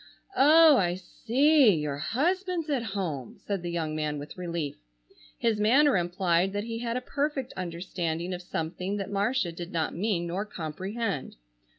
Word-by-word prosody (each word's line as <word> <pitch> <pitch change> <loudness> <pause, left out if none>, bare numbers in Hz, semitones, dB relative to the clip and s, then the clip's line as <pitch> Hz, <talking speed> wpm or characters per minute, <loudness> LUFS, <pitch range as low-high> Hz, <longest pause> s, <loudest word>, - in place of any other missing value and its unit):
"Oh, 310 -1 +7
I 175 -4 +1
see! 245 - +3
Your 150 -2 -2
husband's 340 - -1
at 270 -4 +1
home!" 185 - -4
said 200 -3 -4
the 175 - -4
young 160 -3 -2
man 150 -1 -2
with 145 +1 -8
relief. 170 -5 -4 0.6
His 225 -2 +1
manner 265 +7 +5
implied 175 +1 +1
that 205 0 -2
he 230 0 -4
had 235 0 -2
a - - -3
perfect 280 -1 -2
understanding 175 -1 -3
of 180 - -5
something 180 +3 -3
that 195 0 -4
Marcia 205 -1 0
did 175 +1 -7
not 165 -2 -1
mean 185 -2 -1
nor 180 +4 -2
comprehend. 190 - -4
190 Hz, 160 wpm, -28 LUFS, 170-240 Hz, 0.6 s, Oh